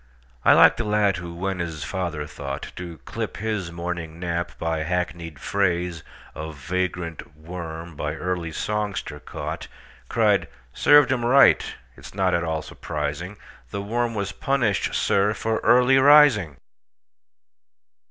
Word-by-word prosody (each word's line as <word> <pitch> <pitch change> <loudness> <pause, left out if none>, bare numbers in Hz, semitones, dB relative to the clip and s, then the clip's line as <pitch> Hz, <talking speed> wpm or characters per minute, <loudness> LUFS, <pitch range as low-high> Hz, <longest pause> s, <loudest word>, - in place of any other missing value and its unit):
I - - +7
like - - +7
the 115 - -1
lad 105 -3 +2
who, 85 0 -7
when 95 +1 -3
his 80 -4 -4
father 85 -6 -3
thoughtTo 75 +2 -7
clip - - -5
his 105 -5 -3
morning 85 -1 -5
nap 85 -1 -2
by 80 -1 -1
hackneyed 85 -1 -3
phraseOf 85 -3 -3
vagrant 90 0 -4
worm 80 0 -7
by 75 +1 -3
early 90 -1 -3
songster 105 -4 -3
caught, - - -6 0.4
Cried, - - +2 0.3
"Served 145 -1 +6
him 125 -2 0
right!—it 120 - +3
's - - -11
not 95 -2 +1
at 85 - +1
all 80 -2 -2
surprising; 75 +9 -5 0.3
The 100 - -4
worm 115 +2 -1
was 100 -2 -2
punished, 130 -8 0
sir, 100 +2 +2
for 110 +2 -1
early 125 +2 +5
rising!" 135 - +6
90 Hz, 130 wpm, -24 LUFS, 80-105 Hz, 0.4 s, I